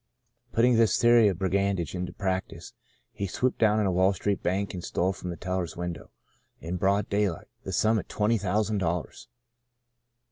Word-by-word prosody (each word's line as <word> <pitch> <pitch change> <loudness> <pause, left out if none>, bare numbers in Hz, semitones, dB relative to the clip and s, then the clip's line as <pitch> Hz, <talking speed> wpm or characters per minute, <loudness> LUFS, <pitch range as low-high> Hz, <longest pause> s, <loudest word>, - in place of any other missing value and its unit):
'' 120 +1 -45
Putting 120 +1 +4
this 115 -4 +3
theory 120 -2 +6
of 95 -4 0
brigandage 95 -3 0
into 90 -1 -4
prac 95 -1 -2
tice, - - -12 0.4
he 100 - -3
swooped 125 +7 -1
down 110 -1 +4
on 105 - +1
a 95 - +1
Wall 95 +2 +3
Street 100 +2 -2
bank 100 +3 -1
and 90 -2 -6
stole 90 +2 0
from 90 - -7
the 85 - -5
teller's 90 -2 -3
window, 85 -1 -5 0.5
in 85 +3 -4
broad 100 +2 +1
daylight, 100 -5 -1 0.2
the - - -4
sum 110 0 +2
of - - -8
twenty 110 +2 +1
thousand 105 +2 0
dollars. 85 -2 -3
100 Hz, 185 wpm, -27 LUFS, 90-105 Hz, 0.5 s, theory